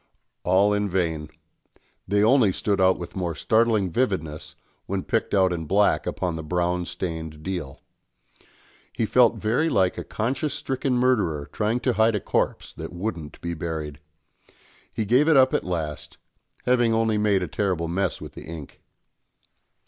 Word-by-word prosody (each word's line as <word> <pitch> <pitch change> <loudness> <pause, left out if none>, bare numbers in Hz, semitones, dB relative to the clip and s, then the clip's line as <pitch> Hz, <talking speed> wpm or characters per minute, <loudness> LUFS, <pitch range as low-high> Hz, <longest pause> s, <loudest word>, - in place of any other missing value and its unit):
All 95 +3 +3
in 105 0 0
vain; 80 -4 -1 0.8
they 100 +1 +2
only 115 -3 +5
stood 100 +1 -1
out 95 0 +4
with 85 - -8
more 90 -4 -2
startling 110 +1 +2
vividness 80 -10 -2 0.3
when 95 -1 -2
picked 115 -3 0
out 95 -2 +3
in 80 -2 -4
black 100 +3 +2
upon 90 -2 -2
the 80 - -4
brown 90 +2 -1
stained 80 -3 -5
deal. 85 -7 -5 1.1
He 115 - 0
felt 120 +1 +4
very 125 +10 +1
like 95 - +1
a - - -4
conscience 130 +6 -2
stricken 135 -2 -1
murderer 105 - +1
trying 110 +3 0
to 125 - +1
hide 110 0 +3
a - - +1
corpse - - -1
that - - -7
wouldn't 85 -5 -5
be 85 0 -3
buried. 80 -3 -5 0.9
He 110 - -2
gave 125 +8 +4
it 160 -3 +5
up 130 0 +5
at - - +1
last, 80 -5 -4 0.5
having 120 -2 +3
only 110 -1 +1
made 100 -3 +2
a - - -3
terrible 90 -5 -1
mess 95 +2 -1
with - - -9
the - - -10
ink. 80 -4 -9
95 Hz, 160 wpm, -24 LUFS, 85-115 Hz, 1.1 s, only